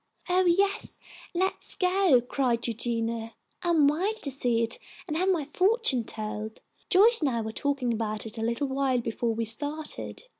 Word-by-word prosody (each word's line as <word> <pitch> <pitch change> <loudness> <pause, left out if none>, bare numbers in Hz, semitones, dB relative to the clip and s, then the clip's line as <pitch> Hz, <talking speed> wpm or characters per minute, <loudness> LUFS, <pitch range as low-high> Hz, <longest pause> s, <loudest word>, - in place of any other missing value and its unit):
"Oh, 365 +1 +3
yes, 395 +4 +1 0.4
let's 375 +2 0
go!" 365 -8 +3
cried 245 -1 0
Eugenia. 230 -1 -2 0.3
"I'm 330 -5 +3
wild 365 +9 +1
to 280 - -1
see 245 -4 +1
it 230 - -3 0.3
and 305 - -3
have 370 +4 +1
my 335 -6 +1
fortune 365 - +2
told. 215 0 -5 0.3
Joyce 435 +5 +6
and 295 - +2
I 235 -3 -1
were 220 0 -4
talking 270 -1 -1
about 215 -1 -3
it 225 +1 -7
a - - -2
little 235 +5 -1
while 265 -1 0
before 230 0 -2
we 230 0 -1
started. 295 - -3
270 Hz, 165 wpm, -27 LUFS, 230-350 Hz, 0.4 s, Joyce